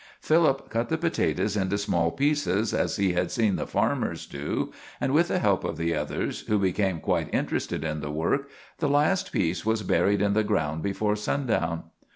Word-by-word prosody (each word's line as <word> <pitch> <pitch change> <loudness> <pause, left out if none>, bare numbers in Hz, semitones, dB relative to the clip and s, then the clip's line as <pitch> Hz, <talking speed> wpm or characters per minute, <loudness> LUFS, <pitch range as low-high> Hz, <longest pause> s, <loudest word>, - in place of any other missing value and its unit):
Philip 155 -4 +2
cut 115 +1 -1
the 160 - +1
potatoes 160 - 0
into 100 0 0
small 85 -5 +1
pieces, 125 - +1
as - - 0
he 95 -3 +1
had 90 +1 0
seen 110 -6 +1
the - - -3
farmers - - 0
do, 70 +1 -3 0.3
and 135 - 0
with 170 +3 +4
the - - 0
help 100 -3 +2
of 80 - -3
the 85 0 0
others, - - -2
who 105 - +2
became 95 -2 +1
quite - - -1
interested - - -1
in 75 -1 -2
the 75 0 -5
work, 85 - -1 0.3
the 150 - +1
last 155 +7 +2
piece 85 -1 0
was 110 0 0
buried 100 +1 +2
in 100 0 +2
the 110 +1 +3
ground 80 -7 0
before 105 +2 0
sundown. 105 - -1
105 Hz, 190 wpm, -26 LUFS, 85-135 Hz, 0.3 s, with